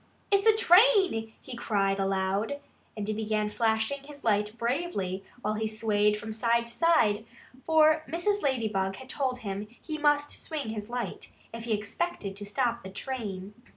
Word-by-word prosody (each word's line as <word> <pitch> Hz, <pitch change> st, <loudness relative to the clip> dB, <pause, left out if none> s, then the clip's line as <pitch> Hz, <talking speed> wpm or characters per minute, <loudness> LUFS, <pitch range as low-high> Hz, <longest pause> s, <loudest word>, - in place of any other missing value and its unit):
"It's 400 Hz, +2 st, +4 dB
a 440 Hz, -, +7 dB
train!" 375 Hz, -, +5 dB
he 255 Hz, -, -8 dB
cried 200 Hz, -4 st, 0 dB
aloud. 195 Hz, +7 st, 0 dB, 0.4 s
And 205 Hz, -1 st, -3 dB
he 215 Hz, -, 0 dB
began 215 Hz, -1 st, -1 dB
flashing 220 Hz, +4 st, 0 dB
his 285 Hz, 0 st, -12 dB
light 210 Hz, 0 st, +1 dB
bravely 235 Hz, -, -2 dB, 0.2 s
while 210 Hz, -, 0 dB
he 220 Hz, +1 st, -1 dB
swayed 210 Hz, -1 st, +1 dB
from 215 Hz, +1 st, -6 dB
side 235 Hz, +1 st, +1 dB
to 235 Hz, -, -8 dB
side, 235 Hz, -8 st, +3 dB, 0.4 s
for 310 Hz, -1 st, +5 dB
Mrs. 405 Hz, +5 st, 0 dB
Ladybug 215 Hz, -8 st, 0 dB
had 260 Hz, +3 st, -11 dB
told 255 Hz, -3 st, -2 dB
him 200 Hz, +1 st, -3 dB
that 220 Hz, +3 st, -22 dB
he 310 Hz, -1 st, -5 dB
must 295 Hz, 0 st, +2 dB
swing 295 Hz, -7 st, -4 dB
his 215 Hz, 0 st, -5 dB
light 245 Hz, 0 st, -5 dB, 0.2 s
if 230 Hz, 0 st, -6 dB
he 230 Hz, -, 0 dB
expected 210 Hz, -, -3 dB
to 205 Hz, -, -6 dB
stop 235 Hz, +2 st, 0 dB
the 190 Hz, -, -8 dB
train. 205 Hz, -3 st, -5 dB
225 Hz, 170 wpm, -28 LUFS, 210-285 Hz, 0.4 s, a